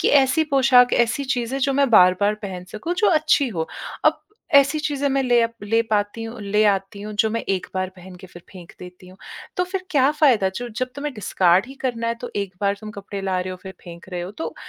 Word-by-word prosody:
कि - - +2
ऐसी 265 +5 +1
पोशाक, 250 -2 +5
ऐसी 240 +4 +1
चीज़ें, 245 +3 -2
जो 275 +1 +1
मैं 275 -2 +2
बार-बार 200 +1 +5
पहन 185 -2 -6
सकूँ, 275 +12 -3
जो 415 +4 +1
अच्छी 305 -4 +2
हों। 165 -7 -3 0.4
अब - - +3 0.3
ऐसी 280 +2 +5
चीज़ें 285 -2 -1
मैं 275 0 +1
ले 245 -2 +3
अप 230 0 -1
ले 225 +3 +1
पाती 205 +2 -1
हूँ 225 0 -7
ले 210 +2 +1
आती 195 0 -1
हूँ, 215 0 -6
जो 220 +1 +2
मैं 230 - -2
1 190 -2 -1
बार 185 0 -1
पहन 180 +1 -12
के 185 - -11
फिर 175 -1 -14
फेंक 180 -2 -12
देती 180 0 -12
हूँ। 185 - -15 0.4
तो 360 - +1
फिर 370 0 -5
क्या 275 -2 +3
फ़ायदा? 250 -11 +3
जो 240 +6 -6
जब 255 +3 -3
तुम्हें 290 0 -4
डिस्कार्ड 185 -2 +2
ही 270 - -11
करना 230 -3 -2
है, 230 - 0
तो 245 +1 -8
एक 195 -2 -3
बार 200 0 +1
तुम 215 0 -8
कपड़े 200 -1 -7
ला 190 -1 -1
रहे 185 - -4
हो, 185 - -6
फिर 190 - -8
फेंक 170 +1 -11
रहे 180 -2 -5
हो। 180 +2 -6
तो 325 - -4
220 Hz, 240 wpm, -22 LUFS, 190-270 Hz, 0.4 s, पोशाक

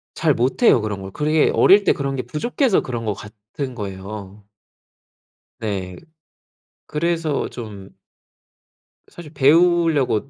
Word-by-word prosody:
잘 160 -3 +2
못해요, 130 - +3
그런 105 -2 -4
걸. 95 0 -8
그게 150 +5 +2
어릴 200 +2 +6
때 - - +3
그런 140 -1 -3
게 130 - -2
부족해서 240 - 0
그런 120 -3 -5
것 105 - 0
같은 105 +6 -8
거예요. 100 0 -8 1.1
네. 95 -4 -4 0.9
그래서 165 -1 -1
좀 105 -5 -9 1.2
사실 165 -3 -12
배우려고 150 -4 +3
130 Hz, 220 characters per minute, -21 LUFS, 105-160 Hz, 1.2 s, 어릴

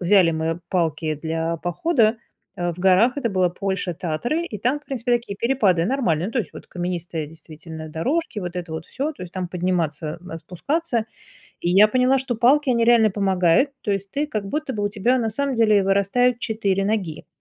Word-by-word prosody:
взяли 180 -1 +5
мы 160 +1 -2
палки 160 -3 0
для 160 +2 -2
похода, 220 - +1 0.4
а, 175 -1 -1
в - - -17
горах. 195 +8 +4
Это 235 -6 -1
была 185 -2 +2
Польша, 190 -1 -3
Татры. 240 - -2
И 210 -10 -6
там, 250 +7 0
в 295 - -27
принципе, 245 -3 -2
такие 235 -4 -1
перепады 200 -9 +2
нормальные, 190 - 0
ну 225 - -6
то 255 - 0
есть 225 - -3
вот - - -11
каменистые 175 -3 -4
действительно 160 0 -10
дорожки, 250 - -2
вот 180 0 -5
это 170 -2 -5
вот 160 0 -5
всё, 295 +4 -3
то 230 - -11
есть 180 - -9
там 185 -2 -3
подниматься, 170 -3 -2
а, 165 - -5
спускаться. 230 - -2 0.5
И 175 - -1
я 205 +3 +7
поняла, 255 +3 +3
что 260 -2 -2
палки 265 +4 +4
они 235 -1 +2
реально 230 -3 +5
помогают, 190 - +3
то 205 - -2
есть 195 0 -3
ты 295 +2 -1
как 215 -7 -3
будто 300 0 -2
бы 210 -2 -3
у 205 - +1
тебя 230 +5 +1
на 225 -2 0
самом 280 +3 -1
деле 215 -3 +4
вырастают 200 +6 +2
4 200 -5 0
ноги. 195 -8 -2
195 Hz, 200 wpm, -22 LUFS, 175-240 Hz, 0.5 s, я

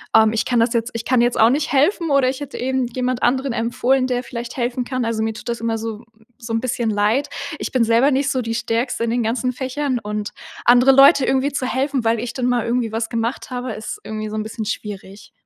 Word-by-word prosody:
Ähm, 220 -1 +6
ich 225 - 0
kann 240 -2 +2
das 230 0 +2
jetzt 230 +1 -1
ich 230 -1 -4
kann 255 -1 +2
jetzt 240 0 +2
auch 225 +1 +6
nicht 290 +2 0
helfen“, 325 +4 +2
oder 270 -2 +4
ich 260 - -4
hätte 285 -1 -7
eben 260 -1 -1
jemand 250 0 -2
anderen 260 +2 +1
empfohlen, 250 +3 +1
der 250 0 -1
vielleicht 235 0 -7
helfen 245 0 -2
kann. 255 -2 -2
Also, 225 -1 -1
mir 220 0 -1
tut 240 +2 -8
das 235 - -2
immer 225 0 -1
so 225 0 -6 0.3
so 230 -1 -6
'n 225 - 0
bisschen 240 -2 -1
leid. 210 +7 +1 0.3
Ich - - -4
bin 250 -3 +3
selber 230 +5 +3
nicht 275 +2 +1
so 255 - 0
die 230 0 -3
Stärkste 230 +1 -1
in 230 - 0
den 240 0 0
ganzen 250 +3 0
Fächern 260 0 -2
und 210 -1 -4 0.3
andere 250 +2 +6
Leute 275 0 +7
irgendwie 270 +2 +1
zu 260 -2 -2
helfen, 260 -1 -1
weil 225 0 +2
ich 240 -1 -4
dann 250 -2 -2
mal 245 -2 +1
irgendwie 235 -2 -1
was 225 0 -2
gemacht 230 +3 -3
habe, 250 -2 -4
ist 220 - -6
irgendwie 215 0 -4
so 215 - -6
'n 215 - -1
bisschen 220 0 -5
schwierig. 205 -2 -6
240 Hz, 245 wpm, -20 LUFS, 225-260 Hz, 0.3 s, Leute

